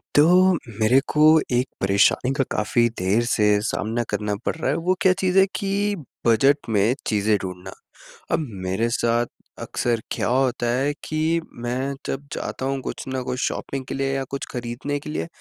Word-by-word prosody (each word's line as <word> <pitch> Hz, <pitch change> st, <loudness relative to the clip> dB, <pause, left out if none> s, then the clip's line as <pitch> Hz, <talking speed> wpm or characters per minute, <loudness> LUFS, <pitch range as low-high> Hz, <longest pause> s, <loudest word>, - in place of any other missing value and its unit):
तो 180 Hz, +5 st, +6 dB, 0.3 s
मेरे 115 Hz, +5 st, +5 dB
को 150 Hz, -, +4 dB, 0.3 s
एक 125 Hz, +2 st, +2 dB
परेशानी 100 Hz, +6 st, +3 dB
का 135 Hz, -, +1 dB
काफ़ी 120 Hz, +3 st, +2 dB
देर 100 Hz, +6 st, +2 dB
से 115 Hz, -3 st, +2 dB, 0.2 s
सामना 115 Hz, +2 st, -1 dB
करना 105 Hz, -1 st, -1 dB
पड़ -, -, 0 dB
रहा 160 Hz, -, -2 dB
है -, -, 0 dB
वो 185 Hz, -, +5 dB
क्या 185 Hz, -, +5 dB
चीज़ 185 Hz, 0 st, +1 dB
है 190 Hz, -, +6 dB
कि 200 Hz, 0 st, 0 dB, 0.3 s
बजट 135 Hz, +4 st, +3 dB
में 110 Hz, +3 st, +2 dB
चीज़ें 105 Hz, -1 st, +2 dB
ढूँढना। 90 Hz, 0 st, -7 dB, 0.6 s
अब -, -, +2 dB, 0.3 s
मेरे 95 Hz, +6 st, 0 dB
साथ 120 Hz, 0 st, +1 dB, 0.4 s
अक्सर 120 Hz, -2 st, -1 dB
क्या -, -, -1 dB
होता 130 Hz, -1 st, +1 dB
है 140 Hz, +3 st, 0 dB
कि, 160 Hz, +2 st, 0 dB
मैं 125 Hz, +3 st, -3 dB
जब 140 Hz, +1 st, -4 dB
जाता 130 Hz, -, -4 dB
हूँ 135 Hz, 0 st, -1 dB
कुछ -, -, -5 dB
न 130 Hz, 0 st, -2 dB
कुछ 125 Hz, 0 st, -3 dB
शॉपिंग 135 Hz, -1 st, -4 dB
के -, -, -5 dB
लिए 135 Hz, 0 st, -1 dB
या 135 Hz, -, -1 dB
कुछ 140 Hz, -, -3 dB
ख़रीदने 125 Hz, +4 st, -4 dB
के 150 Hz, -, -9 dB
लिए 155 Hz, -, -3 dB
125 Hz, 180 wpm, -23 LUFS, 115-145 Hz, 0.6 s, तो